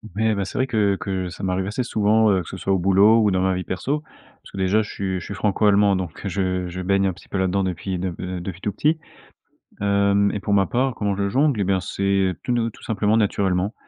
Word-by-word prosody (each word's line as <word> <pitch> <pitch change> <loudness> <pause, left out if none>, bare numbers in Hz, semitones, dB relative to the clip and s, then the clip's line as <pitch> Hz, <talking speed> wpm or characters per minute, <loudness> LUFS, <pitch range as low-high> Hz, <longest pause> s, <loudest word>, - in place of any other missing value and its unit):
Ouais, 110 0 +2
bah, 100 -2 -2
c'est - - -7
vrai 130 - +2
que 105 -5 +1
que 95 -1 -3
ça 90 +3 -9
m'arrive 95 0 -1
assez 110 +5 -2
souvent, 110 -1 +3
heu, 95 - +2
que 80 - -11
ce - - -7
soit 95 - -3
au 95 - +2
boulot 100 +5 +5
ou 105 -2 +3
dans 95 - +1
ma 95 0 +2
vie 90 -2 -3
perso, 135 +11 -2
parce - - -21
que - - -8
déjà 95 +3 +2
je 105 - -6
suis 95 -2 -3
je - - -9
suis - - -6
Franco-Allemand, 100 -1 +3
donc 90 +1 -6
heu, 100 - -1
je 95 -1 -1
je 90 +1 -5
baigne 95 +1 +1
un 95 - +1
petit 95 - -17
peu 100 - -4
là-dedans 95 +1 +1
depuis 90 0 -3
depuis, 90 -2 -4
heu, 90 0 -4
depuis 90 +1 -7
tout 105 - -1
petit. 155 +9 +1 0.8
Hem 100 0 +2
et 105 - -2
pour 100 +1 -1
ma 100 -1 +4
part, 130 +3 0
comment 105 -2 -1
je 100 0 0
jongle? 135 +1 +2
Eh - - +2
bien, 95 0 +1
c'est 95 0 0
tout 125 - -1
ne 115 -1 0
tout - - -16
simplement, 105 0 +1
naturellement. 100 -1 0
100 Hz, 260 wpm, -22 LUFS, 95-105 Hz, 0.8 s, boulot